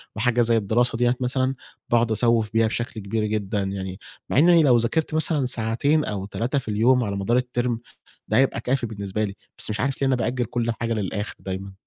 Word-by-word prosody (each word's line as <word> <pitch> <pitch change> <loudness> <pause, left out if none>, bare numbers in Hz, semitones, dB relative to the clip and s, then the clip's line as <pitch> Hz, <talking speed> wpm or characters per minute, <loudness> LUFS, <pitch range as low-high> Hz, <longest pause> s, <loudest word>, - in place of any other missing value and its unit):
وحاجة 120 +2 +2
زي 115 -1 +3
الدراسة 115 +3 +1
دِيّة 120 +1 +2
مثلًا 130 +1 0 0.3
باقعد 120 -1 +2
أسوِّف 115 -1 +2
بيها 115 0 +3
بشكل 115 +1 -3
كبير 105 +2 -1
جدًا 105 -1 -1
يعني 95 -1 -4 0.3
مع - - 0
إني 170 +1 +6
لو 125 -5 +5
ذاكرت 150 +8 0
مثلًا 155 -3 +1
ساعتين 125 +6 +1
أو 100 -2 -3
3 115 +8 -1
في 130 - -11
اليوم 120 +4 +3
على 100 -3 -2
مدار 100 +5 +1
الterm 125 -1 -1 0.5
ده 110 - +1
هيبقى 130 -2 +3
كافي 125 +1 0
بالنسبة 100 -1 -3
لي، 100 -2 -4 0.2
بس - - -1
مش 105 0 -2
عارف 135 +2 -1
ليه 135 - +3
أنا 130 - +2
بأجل 120 +1 -1
كُل 120 +1 -1
حاجة 115 0 0
للآخر 105 0 -3
دايمًا. 95 +1 -5
115 Hz, 200 wpm, -24 LUFS, 105-125 Hz, 0.5 s, إني